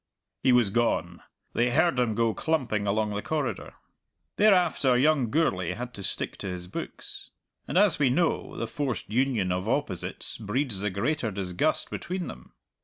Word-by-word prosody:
He 130 - +4
was 120 -5 +4
gone 95 -7 0 0.3
they 120 +1 +2
heard 160 +2 +3
him 115 -3 +1
go 115 0 +2
clumping 120 -11 -1
along 105 +1 +1
the 105 0 -2
corridor. 145 -5 -3 0.6
Thereafter 180 -11 +4
young 140 -3 +3
Gourlay 95 - +1
had 125 +5 -6
to 100 - -8
stick - - -3
to - - -6
his 90 -1 -5
books. - - -7 0.4
And, - - -1
as 200 -6 +4
we 140 -3 +4
know, 165 +6 0
the 115 - -2
forced 120 -3 -3
union 120 -6 +1
of 90 +4 -1
opposites 130 -9 -2
breeds 115 0 -1
the 105 +1 -1
greater 115 +6 -1
disgust 95 -3 -1
between 180 0 -3
them. 60 - -10
120 Hz, 165 wpm, -27 LUFS, 100-145 Hz, 0.6 s, He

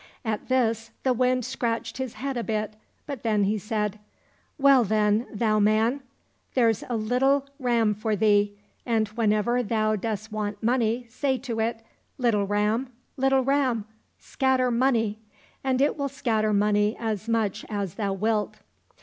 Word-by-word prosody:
At 215 -2 -2
this 230 -3 +1
the 260 - +3
Wind 250 0 +1
scratched 235 -2 -3
his 260 -3 -3
head 275 0 -4
a 240 - -2
bit, 215 -1 -2 0.3
but 280 -6 -6
then 215 -3 +1
he 210 +2 +1
said, 210 0 -2 0.3
" - - -39
Well 275 -3 +6
then, 215 +2 +1
thou 215 0 +1
man! 220 +6 +2 0.5
there's 230 -4 +3
a 240 - 0
little 265 +5 +2
ram 235 -4 +2
for 215 +1 -1
thee, 205 0 +2 0.3
and 225 -3 +1
whenever 220 +2 +1
thou 215 -1 +1
dost 215 +1 -4
want 210 0 -4
money 240 0 +1
say 265 +3 -1
to 240 -4 -4
it, 225 0 -1 0.2
* - - -43
Little 225 -6 +1
ram, 210 +5 0 0.3
little 270 0 +2
ram, 260 -5 +1 0.3
scatter 260 -2 +1
money! 230 -4 +1 0.2
' - - -32
and 260 -1 +1
it 285 +2 +2
will 280 0 -1
scatter 220 -5 0
money 210 +1 +2
as 220 -1 -3
much 220 -4 0
as 200 -5 -3
thou 205 -3 -2
wilt. 210 +2 -1
225 Hz, 160 wpm, -26 LUFS, 210-250 Hz, 0.5 s, Well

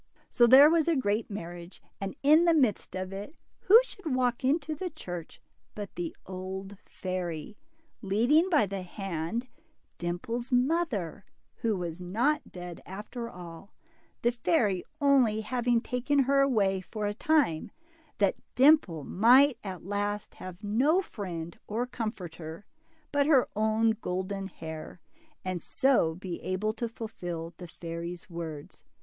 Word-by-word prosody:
So 240 -1 +5
there 265 +4 +10
was 325 0 +3
a 335 - +3
great 215 -4 0
marriage 175 -3 -7
5 - - -34
and 195 -1 -4
in 310 +4 +6
the 335 -1 +5
midst 250 -12 +1
of 185 +1 -4
it, 205 +11 -7 0.2
who 430 +5 +8
should 355 - -4
walk 250 -1 +1
into 300 +3 +1
the 360 +5 -4
church 175 - -8 0.4
but 205 -2 -6
the 175 -2 -4
old 190 +1 -6
fairy, 180 -1 -4 0.5
leading 240 - +3
by 300 - +4
the 195 0 -4
hand 190 +4 -4 0.5
Dimple's 230 +9 -3
mother, 250 - 0 0.3
who 220 -3 0
was 175 -1 -5
not 240 +12 0
dead 175 -1 -8
after* 215 +5 -7
all, 180 0 -11 0.5
the 240 - +4
fairy 230 - +1 0.2
only 260 -7 +4
having 240 +1 +1
taken 260 +4 +1
her 275 +1 +3
away 200 -8 +2
for 210 +3 -5
a 205 - 0
time, 235 - +1 0.5
that 200 -2 +2 0.2
Dimple 255 - +5
might 245 - +5
at 185 -4 -7
last 205 +1 -2
have 185 +2 -10
no 270 - +3
friend 170 - -6
or 230 +4 -1
comforter 180 -8 -6 0.5
but 285 0 +2
her 275 -5 +5
own 220 +1 +3
golden 190 +2 -3
hair, 160 -2 -8 0.5
and 185 -2 -2
so 260 - +2
be 180 -1 -6
able 205 +4 -1
to 230 +1 -3
fulfil 175 -8 -6
the 180 - -8
fairy's 170 +1 -7
words. 160 -3 -7
210 Hz, 145 wpm, -29 LUFS, 180-255 Hz, 0.5 s, there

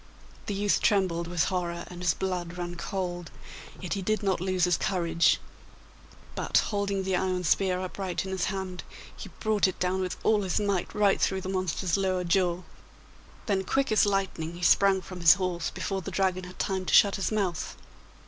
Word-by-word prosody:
The 205 - -2
youth 205 0 +1
trembled 180 -5 +1
with 175 -1 +1
horror, 170 -1 -2
and 180 0 -9
his 175 -3 +2
blood 180 -2 -3
ran 175 0 -4
cold, 175 -1 -4 0.5
yet 180 - -4
he 195 - -2
did 215 +3 -1
not 190 -3 0
lose 185 -1 0
his 180 -1 +4
courage; 170 -3 +2 0.9
but, - - 0
holding 200 -2 0
the 190 0 0
iron 185 0 0
spear 185 +2 +2
upright 185 0 -3
in 190 - -5
his 190 -1 -1
hand, 190 -2 -4 0.3
he - - -9
brought 215 -3 +2
it 185 - -5
down 185 +1 0
with 185 -1 -3
all 215 -1 +3
his 190 -1 0
might 200 -4 -1
right 205 -2 +3
through 190 -1 +1
the 185 - -5
monster's 185 -1 -1
lower 185 -2 0
jaw. 180 0 +1 0.8
Then 195 -4 0
quick 270 +5 0
as 215 -1 +4
lightning 190 -5 -1
he 175 - -8
sprang 195 +1 +4
from 185 -1 -9
his 170 0 +7
horse 180 -3 -2
before 195 -1 -3
the - - -6
Dragon 185 -1 0
had 180 0 -11
time 190 -1 -2
to - - -1
shut 200 -1 +6
his 195 - -1
mouth. 195 -7 -2
185 Hz, 190 wpm, -28 LUFS, 180-195 Hz, 0.9 s, his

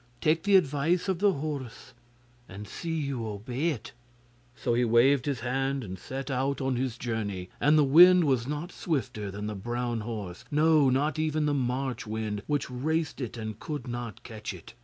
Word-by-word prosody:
Take 160 +1 +2
the 200 -1 +5
advice 165 +2 +2
of 190 -3 0
the 205 0 +4
horse, 140 -4 -5 0.6
and 100 +2 -8
see 170 - -6
you 140 -7 -2
obey 120 +9 -2
it.' 125 -9 -5 0.6
So 125 -2 -1
he 120 +1 +2
waved 125 +4 +4
his 135 -5 -1
hand 135 +2 -1
and 95 -3 -7
set 135 +6 -5
out 135 +1 0
on 135 -2 0
his 125 -1 -2
journey, 105 -7 -3
and 150 +2 +5
the 150 - +6
wind 175 +6 +8
was 130 -5 +1
not 150 +5 -4
swifter 125 - -3
than 100 +2 -5
the 105 - -3
brown 120 +3 -2
horse 105 -5 -6
no, 150 -1 +4
not 145 +3 +1
even 155 -1 +1
the 150 - +1
March 130 -2 -2
wind 105 -1 -3
which 145 -1 0
raced 145 +4 -2
it 120 -1 -5
and 110 -1 -5
could 145 -5 -5
not 120 -3 -5
catch 110 -3 -6
it. 90 +5 -13
130 Hz, 185 wpm, -28 LUFS, 115-150 Hz, 0.6 s, wind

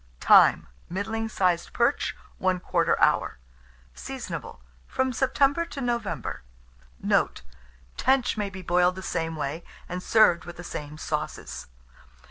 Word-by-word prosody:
Time. - - +6 0.2
Middling 220 +4 -3
sized 180 -5 0
perch, 240 +4 +1 0.3
1/4 180 -2 +1
hour. - - +2 0.6
Seasonable - - -7 0.3
from 260 -1 0
September 275 +5 +2
to 290 - -8
November. 240 -5 -2 0.6
Note. - - +1 0.5
Tench 260 -1 +2
may 205 -2 -2
be 190 -1 -9
boiled 180 +1 +3
the 190 - -7
same 165 -3 -2
way, 155 +2 -4 0.2
and 180 +1 -4
served 180 -6 +4
with 175 - -10
the 175 - -8
same 150 -3 -7
sauces. - - -4
185 Hz, 120 wpm, -26 LUFS, 170-235 Hz, 0.6 s, Time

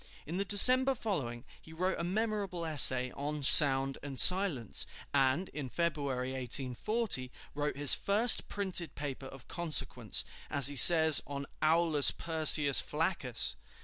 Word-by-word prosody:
In 165 +4 -9
the 200 - -5
December 255 +7 +2
following 135 - -8 0.2
he 160 - -18
wrote 185 +3 -6
a - - -6
memorable 200 -2 -7
essay 130 -5 +2
on 145 +1 -9
"Sound 135 -1 +6
and 135 -3 -9
Silence," 180 - +4 0.3
and 135 +6 -3
in 140 -4 -11
February, 140 -5 -7
1840, 130 - -3 0.2
wrote 145 0 -7
his 145 -2 +3
"first 215 +4 0
printed 185 -6 -5
paper 140 -2 -10
of 135 -1 -16
consequence," 170 -5 -2 0.2
as 140 -1 +2
he 145 - -9
says, 160 +1 +6
on 140 0 -10 0.2
"Aulus 160 -2 +2
Persius 155 -3 +1
Flaccus." 150 - -4
150 Hz, 135 wpm, -27 LUFS, 135-180 Hz, 0.3 s, Sound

